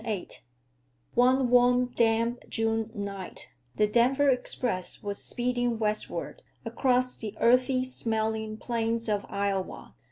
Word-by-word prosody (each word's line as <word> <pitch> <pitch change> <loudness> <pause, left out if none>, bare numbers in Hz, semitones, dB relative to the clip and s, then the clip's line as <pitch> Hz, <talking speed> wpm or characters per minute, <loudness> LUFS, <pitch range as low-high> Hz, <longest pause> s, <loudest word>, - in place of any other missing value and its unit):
VIII 210 -6 -3 0.8
One 255 +1 +3
warm 245 0 +4
damp 230 +1 +1
June 225 0 0
night 200 -2 -6 0.3
the 210 - +3
Denver 250 +6 +3
Express 245 -6 -1
was 200 -1 -3
speeding 245 -1 0
westward 215 - -2 0.2
across 255 -1 +1
the 215 -1 -6
earthy 255 +2 +3
smelling 220 -3 -2
plains 230 0 -2
of 205 -2 -1
Iowa. 200 -1 -3
230 Hz, 115 wpm, -28 LUFS, 215-250 Hz, 0.8 s, warm